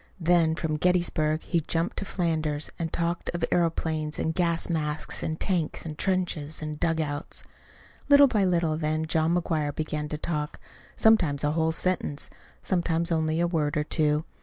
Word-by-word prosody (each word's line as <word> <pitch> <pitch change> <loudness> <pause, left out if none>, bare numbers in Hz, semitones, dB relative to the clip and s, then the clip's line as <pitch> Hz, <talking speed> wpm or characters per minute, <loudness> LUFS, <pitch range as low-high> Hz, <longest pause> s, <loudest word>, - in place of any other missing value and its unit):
Then 165 -2 +3
from 160 -2 -2
Gettysburg 160 -3 +1
he 170 - +1
jumped 165 +5 -2
to 200 - -2
Flanders, 155 -5 -1
and 165 -1 -2
talked 170 +1 -1
of 170 -1 0
aeroplanes, 160 -3 0
and 160 - -1
gas 170 -1 0
masks, 155 -2 -2
and 160 0 -3
tanks, 175 -5 -1
and 155 -2 -5
trenches, 170 -5 -1
and 150 -1 -5
dugouts. 155 -3 -1 0.7
Little 285 0 +9
by 220 -7 +2
little 170 -4 +1
then 155 0 -1
John 160 +1 +1
McGuire 155 -4 -1
began 150 -1 -3
to 150 - -3
talk 150 -2 -3 0.4
sometimes 175 -11 +3
a 145 - +2
whole 160 +1 +1
sentence, 160 -4 -1 0.3
sometimes 170 -2 0
only 160 0 +1
a 170 - +3
word 155 -4 0
or 150 - +1
two. 150 0 +1
160 Hz, 160 wpm, -27 LUFS, 155-175 Hz, 0.7 s, Little